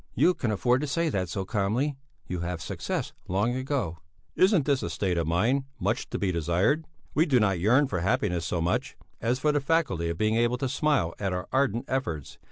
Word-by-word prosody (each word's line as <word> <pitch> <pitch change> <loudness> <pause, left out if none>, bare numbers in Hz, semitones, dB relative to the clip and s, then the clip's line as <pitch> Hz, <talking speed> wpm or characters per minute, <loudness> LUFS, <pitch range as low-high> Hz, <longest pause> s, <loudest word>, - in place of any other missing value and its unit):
"You 180 - +4
can 120 - -2
afford 120 +5 +2
to 150 - -2
say 165 +3 0
that 95 - -1
so 95 0 -3
calmly; 115 +8 0 0.3
you 90 - -3
have 85 0 -3
had - - -10
success - - -3
long 100 +6 +1
ago." 130 - -2 0.4
"Isn't 185 -6 +4
this 140 -3 +2
a - - -3
state 95 -3 -1
of 85 -2 0
mind 115 +12 +2
much - - -1
to - - -3
be 95 -2 0
desired? 90 - +1 0.3
We 160 +4 +3
do 130 -5 +4
not 100 -5 +2
yearn 125 +10 +4
for 95 -8 -2
happiness 90 -1 0
so 85 0 -1
much, 85 +2 -1 0.2
as 120 +3 +1
for 150 +3 +2
the 145 -1 +1
faculty 135 - +1
of 85 - -3
being 110 +3 +2
able 120 +1 +2
to 135 - -1
smile 135 - +1
at 95 -2 -1
our 90 0 -3
ardent 130 -2 +1
efforts. 85 - -3
110 Hz, 215 wpm, -27 LUFS, 90-135 Hz, 0.4 s, You